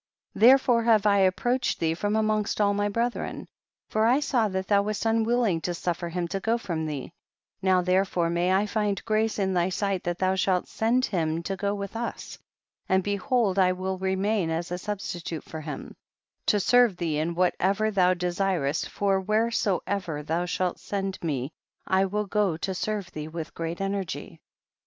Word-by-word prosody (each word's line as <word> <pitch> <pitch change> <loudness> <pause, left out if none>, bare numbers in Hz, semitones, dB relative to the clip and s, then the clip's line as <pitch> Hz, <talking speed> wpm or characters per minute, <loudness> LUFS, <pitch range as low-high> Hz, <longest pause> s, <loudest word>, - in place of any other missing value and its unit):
58. 225 - +5
Therefore 255 -2 +5
have 220 -3 +4
I 200 -1 +5
approached 240 +7 +1
thee 160 -1 +1
from 205 +5 -1
amongst 215 -1 0
all 205 -1 +3
my 205 0 0
brethren, 235 +3 -2 0.4
for 220 +1 +2
I 255 +4 +4
saw 250 -6 +1
that 190 -1 -3
thou 200 -1 +4
wast 210 +2 -3
unwilling 225 -5 +2
to 175 +1 -2
suffer 175 0 -2
him 175 0 -2
to 195 - -2
go 225 +4 +1
from 170 -8 -3
thee; 150 +1 -5 0.5
now 185 -1 +3
therefore 180 -2 +1
may 175 +2 +1
I 195 +2 +3
find 210 -2 -1
grace 215 0 +1
in 190 -2 0
thy 175 0 +2
sight 195 0 -1
that 175 0 -1
thou 185 0 +1
shalt 185 -1 +1
send 240 +4 +1
him 165 -3 -1
to 195 +3 -3
go 200 +1 -1
with 200 +1 -6
us, 235 +1 -5 0.5
and 190 0 +3
behold 205 0 +1
I 185 -1 +4
will 185 0 -3
remain 190 0 0
as 165 +2 -3
a 180 - -2
substitute 175 -5 -5
for 160 - -8
him, 150 -2 -7 0.5
to 210 - +4
serve 240 -1 +4
thee 160 -4 -1
in 165 +2 -1
whatever 190 +4 +1
thou 185 -2 +3
desirest, 175 -4 -1
for 195 -1 +1
whereso 215 -1 +1
ever 175 -7 -3
thou 165 +4 -1
shalt 180 0 -1
send 195 -1 -3
m.e 140 -4 -2 0.3
I 190 +1 +2
will 210 +2 -1
go 200 -5 0
to 190 +3 -3
serve 205 0 -3
thee 155 0 -6
with 160 0 -6
great 165 +1 -4
energy. 195 -2 -4
190 Hz, 185 wpm, -26 LUFS, 175-210 Hz, 0.5 s, 58